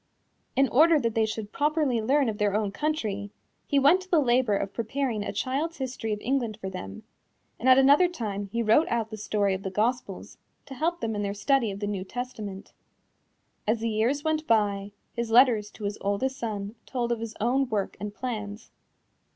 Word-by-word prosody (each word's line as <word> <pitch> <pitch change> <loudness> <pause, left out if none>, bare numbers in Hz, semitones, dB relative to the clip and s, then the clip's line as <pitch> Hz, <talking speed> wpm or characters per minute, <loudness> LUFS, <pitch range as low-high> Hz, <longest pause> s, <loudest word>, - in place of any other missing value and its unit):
In 270 0 +4
order 315 +4 +5
that 230 -4 -1
they 220 -1 +2
should 215 -1 -5
properly 295 -5 +1
learn 275 +4 +2
of 215 -1 -3
their 205 -1 +1
own 210 -2 0
country, 210 -7 -2 0.4
he 285 - +1
went 290 +7 +5
to 370 - -14
the 345 - +4
labor 245 -5 +3
of 195 0 -4
preparing 230 -1 -2
a - - -3
Child's 290 +6 -2
History 255 -4 -4
of 210 - -2
England 235 -4 -1
for 190 -2 -5
them, 95 - -7 0.6
and 260 - +2
at 255 - +8
another 285 +6 +6
time 205 - -4
he 235 +1 0
wrote 230 +9 +4
out 230 -1 -1
the 215 - -5
story 205 -1 0
of 190 - -3
the 195 - -3
Gospels, 215 0 -2 0.3
to 275 - -9
help 335 +6 -1
them 225 -1 -2
in 205 - -2
their 200 0 -2
study 245 +2 +2
of 200 +1 -6
the - - -1
New 200 -2 -3
Testament. 215 -3 -7 0.9
As 220 +2 +2
the 230 +1 -1
years 235 +7 0
went 315 0 -1
by, 205 -2 +1 0.2
his 235 -1 -3
letters 225 -3 +5
to 215 - -12
his 205 +1 -3
oldest 205 +7 -1
son 210 -3 -4
told 240 -2 -2
of 235 - 0
his 230 -1 -6
own 250 +4 +1
work 205 -3 -2
and 205 +1 -4
plans. 215 -2 -6
230 Hz, 200 wpm, -27 LUFS, 205-265 Hz, 0.9 s, at